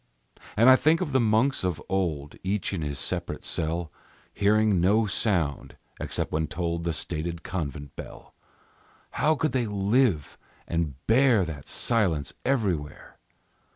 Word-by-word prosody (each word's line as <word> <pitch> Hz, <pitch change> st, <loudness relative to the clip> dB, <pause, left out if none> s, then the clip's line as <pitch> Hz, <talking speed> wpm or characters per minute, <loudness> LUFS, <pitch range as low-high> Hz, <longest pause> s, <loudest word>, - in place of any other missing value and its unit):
And 115 Hz, +4 st, +6 dB
I 130 Hz, -, +10 dB
think 155 Hz, +5 st, +3 dB
of 175 Hz, -6 st, -2 dB
the 130 Hz, -, +3 dB
monks 115 Hz, +3 st, +2 dB
of 90 Hz, -3 st, -1 dB
old, 80 Hz, -7 st, -2 dB
Each 100 Hz, +1 st, -2 dB
in 90 Hz, -, -2 dB
his 75 Hz, -2 st, -3 dB
separate -, -, -4 dB
cell, 80 Hz, 0 st, -2 dB, 0.4 s
Hearing 105 Hz, -2 st, +3 dB
no 105 Hz, +5 st, +4 dB
sound, 90 Hz, -8 st, -1 dB, 0.2 s
except -, -, -2 dB
when 80 Hz, 0 st, 0 dB
tolled 85 Hz, 0 st, -3 dB
The 85 Hz, -, +1 dB
stated 85 Hz, +1 st, -4 dB
convent 70 Hz, -5 st, -5 dB
bell. -, -, -10 dB, 0.8 s
How 155 Hz, +2 st, +2 dB
could 155 Hz, 0 st, 0 dB
they 125 Hz, -3 st, 0 dB
live 100 Hz, -, +1 dB, 0.3 s
and 85 Hz, -5 st, -1 dB
bear 115 Hz, -4 st, +4 dB
that 75 Hz, -4 st, -7 dB
silence 90 Hz, -, 0 dB
everywhere? 95 Hz, -, -2 dB
95 Hz, 140 wpm, -26 LUFS, 80-115 Hz, 0.8 s, I